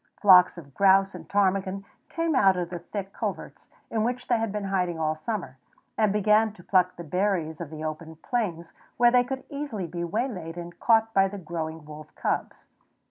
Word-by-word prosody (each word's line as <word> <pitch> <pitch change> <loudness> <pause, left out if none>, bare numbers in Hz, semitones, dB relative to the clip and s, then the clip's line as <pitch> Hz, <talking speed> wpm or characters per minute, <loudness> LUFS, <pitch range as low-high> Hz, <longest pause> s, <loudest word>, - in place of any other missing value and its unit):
Flocks 185 -3 +7
of 140 -5 -12
grouse 195 +1 +4
and - - -10
ptarmigan 195 -1 0 0.2
came 330 -1 -1
out 195 -8 +4
of 175 -1 -3
the 175 - -4
thick 195 +3 -6
coverts, - - -5 0.2
in 220 -1 0
which 250 +2 -2
they 240 -2 +2
had 225 -2 -1
been 210 0 -3
hiding 180 -3 -1
all 155 -1 +1
summer, 155 - -5 0.4
and 215 -2 +2
began 210 +2 +3
to 175 - -16
pluck 180 -1 +2
the 170 - -8
berries 175 -2 -1
of 165 - -6
the 155 0 -7
open 155 +1 -5
plains, 170 -3 -3 0.2
where 240 0 +5
they 250 0 +5
could 265 +1 -5
easily 280 -10 -4
be 170 +1 -5
waylaid 180 -3 -3
and 175 0 -8
caught 225 -1 +3
by 195 0 +4
the 200 +1 -7
growing 160 -3 -5
wolf 155 0 -11
cubs. - - -3
190 Hz, 190 wpm, -26 LUFS, 170-215 Hz, 0.4 s, Flocks